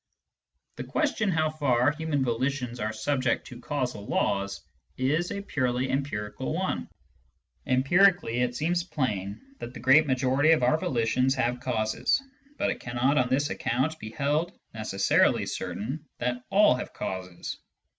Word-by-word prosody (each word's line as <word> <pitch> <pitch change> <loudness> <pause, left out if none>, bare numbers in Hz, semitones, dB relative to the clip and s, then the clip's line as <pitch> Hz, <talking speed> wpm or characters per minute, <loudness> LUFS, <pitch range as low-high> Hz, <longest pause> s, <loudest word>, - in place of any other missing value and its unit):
The - - -4
question 280 -9 0
how 155 -3 +1
far 140 -3 +2
human 150 -2 -1
volitions 125 0 -1
are 110 -1 -1
subject 130 +4 0
to 120 - -10
causal 125 -5 -3
laws 100 0 0 0.4
is 150 +7 +1
a 200 0 -4
purely 130 -6 -1
empirical 120 -7 -2
one. - - -2 0.8
Empirically 165 +1 +4
it 125 -1 0
seems 170 +5 0
plain 105 - -2 0.2
that 120 - -7
the - - -7
great 135 +5 +5
majority 130 +4 +3
of 150 - +1
our 155 +6 +3
volitions 125 0 +1
have 125 -1 0
causes, 110 - +1 0.4
but - - +1
it - - -5
cannot, 125 +4 +1
on 125 -1 +1
this 145 +3 +1
account, 130 +7 -1
be 110 - -7
held 150 - -1 0.2
necessarily 105 -3 +2
certain 135 +9 -4
that 125 +1 -2
all 205 +2 +6
have 125 - -5
causes. 90 -2 -5
130 Hz, 145 wpm, -27 LUFS, 120-150 Hz, 0.8 s, all